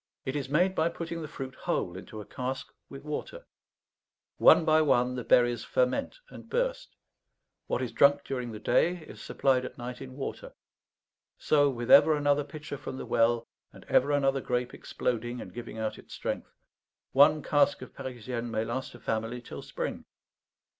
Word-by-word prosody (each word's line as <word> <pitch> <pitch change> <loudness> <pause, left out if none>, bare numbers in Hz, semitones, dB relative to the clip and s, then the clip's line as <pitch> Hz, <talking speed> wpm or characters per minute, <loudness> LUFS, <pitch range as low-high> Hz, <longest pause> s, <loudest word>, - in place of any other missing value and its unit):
It 130 - -3
is 140 -2 -3
made 180 +6 +3
by 160 -2 +2
putting 170 0 -5
the 155 - -5
fruit 135 -2 -7
whole 90 -7 -2
into 105 +3 -8
a - - -10
cask 130 +1 -5 0.2
with 135 - -10
water; 155 - -5 0.9
one 160 - +7
by 155 0 +5
one 125 -4 +3
the 125 -1 -4
berries 120 -1 +3
ferment 125 - 0
and - - -12
burst; - - -2 0.7
what - - -1
is 125 - -3
drunk 145 0 +4
during 125 -3 -4
the 110 - -6
day 170 +10 +1
is - - -12
supplied 130 -2 +1
at 130 - -7
night 125 +1 -6
in 130 -1 -9
water; 135 - -6 0.8
so, 145 -2 +3
with 120 -2 -3
ever 155 - +8
another 145 0 +2
pitcher 145 -1 -8
from 130 - -6
the - - -6
well, 115 0 +2 0.3
and - - -14
ever 140 +3 +3
another 135 -1 +2
grape 125 0 -2
exploding 120 0 -3
and - - -9
giving 120 -1 -7
out 110 -1 -3
its - - -11
strength, - - -4 0.6
one 150 +2 +5
cask 145 -1 +2
of - - -12
Parisienne 125 -2 -5
may 110 -1 -1
last 120 +2 -4
a - - -12
family 115 +2 -2
till 120 - -9
spring. - - -5
130 Hz, 175 wpm, -29 LUFS, 120-145 Hz, 0.9 s, ever